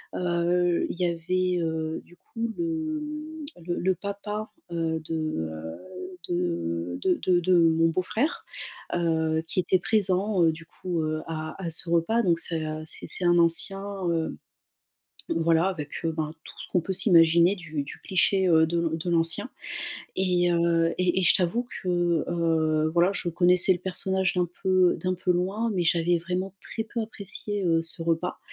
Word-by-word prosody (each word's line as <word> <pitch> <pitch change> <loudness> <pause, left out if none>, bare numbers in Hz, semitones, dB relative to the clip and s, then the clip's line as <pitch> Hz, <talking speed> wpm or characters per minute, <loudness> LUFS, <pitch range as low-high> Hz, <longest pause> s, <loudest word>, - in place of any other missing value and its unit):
heu, 175 0 +1
il - - -7
y 180 - +2
avait, 180 +2 0
heu, 160 0 -2
du 175 - -19
coup 230 +4 -5
le 320 -2 -2 0.6
le 175 0 -2
le 190 +1 +1
papa, 210 +2 -5 0.2
heu, 165 -1 -1
de, 165 - -1 0.3
heu, 80 +1 -7 0.5
de 90 - -2
de 185 -1 +2
de 180 -1 +3
de 180 +1 +3
mon 165 -1 +4
beau-frère, 185 - -1 0.5
heu, 160 -2 +1
qui 175 - -1
était 185 +1 +2
présent, 200 -2 +1
heu, 165 - +5
du 165 +1 -10
coup, 175 0 -4
heu, 155 0 -2
à 155 +2 -5
à 170 - -2
ce 165 +1 -1
repas 170 +8 +2
donc 170 -4 +2
c'est, 165 -2 -1
heu, 155 0 -4
c'est - - -5
c'est 180 - -1
un 175 0 +5
ancien, 170 +4 +2 0.3
heu, 165 -1 -1 0.9
voilà 165 +1 +2
avec, 155 -7 -3
heu, 165 - +2
ben 155 -1 -2
tout - - -11
ce - - -9
qu'on 180 - +3
peut 190 - -3
s'imaginer 170 -1 +5
du 160 -5 -4
du - - -9
cliché, 190 0 +2
heu, 160 -1 +5
de 170 +1 -1
l 160 - -1
de 175 +2 -3
l'ancien 165 +6 +1 0.7
et 180 -2 +2
heu 170 -1 +2
et 185 0 +2
et - - 0
je 170 - +6
t'avoue 195 +7 0 0.2
que, 175 -3 +1
heu, 160 -2 +1
voilà 175 +2 +4
je 180 - -1
connaissais 180 +2 +4
le - - -3
personnage 190 +1 0
d'un 180 -2 +1 0.2
peu 185 -2 +4
d'un 185 0 +1
peu 180 0 0
loin, 195 +6 0
mais 180 -3 0
j'avais 170 0 +2
vraiment 180 +3 -3
très 225 - -4
peu 230 +1 -4
apprécié, 205 -1 -3
heu, 165 -1 +3
ce 165 +1 +3
repas, 165 +2 -1
175 Hz, 175 wpm, -26 LUFS, 165-185 Hz, 0.9 s, je